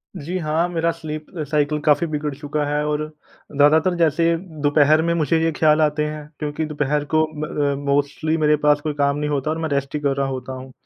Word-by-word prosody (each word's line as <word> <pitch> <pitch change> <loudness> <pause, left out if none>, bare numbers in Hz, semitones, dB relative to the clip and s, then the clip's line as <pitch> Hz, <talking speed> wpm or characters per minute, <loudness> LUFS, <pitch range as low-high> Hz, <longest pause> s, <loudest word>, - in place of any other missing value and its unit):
जी, 175 +6 -4
हाँ। 160 +1 0
मेरा 170 -1 0
sleep 155 -2 -7 0.3
cycle 150 0 +1
काफ़ी 150 +3 +3
बिगड़ 150 -1 -3
चुका 145 +1 -3
है। 150 0 0
और 150 0 -1 0.5
ज़्यादातर 155 +5 +4
जैसे 165 0 +2 0.3
दोपहर 150 +1 +4
में 170 +1 +1
मुझे 160 -1 +1
ये 165 - +2
ख़्याल 155 0 +3
आते 150 0 +1
हैं 150 -1 -6
क्योंकि 150 +1 -3
दोपहर 150 -1 -1
को 155 - +5 0.2
म - - -1
अ, 145 -2 -1 0.2
मोस्टली 145 +3 0
मेरे 150 -1 +3
पास 150 0 +2
कोई 150 -1 -2
काम 140 0 +1
नहीं 150 0 -2
होता 145 +1 -1
और 160 - -2
मैं 160 - -2
रेस्ट 140 0 -2
ही 150 - 0
कर 140 -2 +1
रहा 140 - 0
होता 130 -1 -5
हूँ। 130 0 -9
150 Hz, 215 wpm, -21 LUFS, 145-155 Hz, 0.5 s, को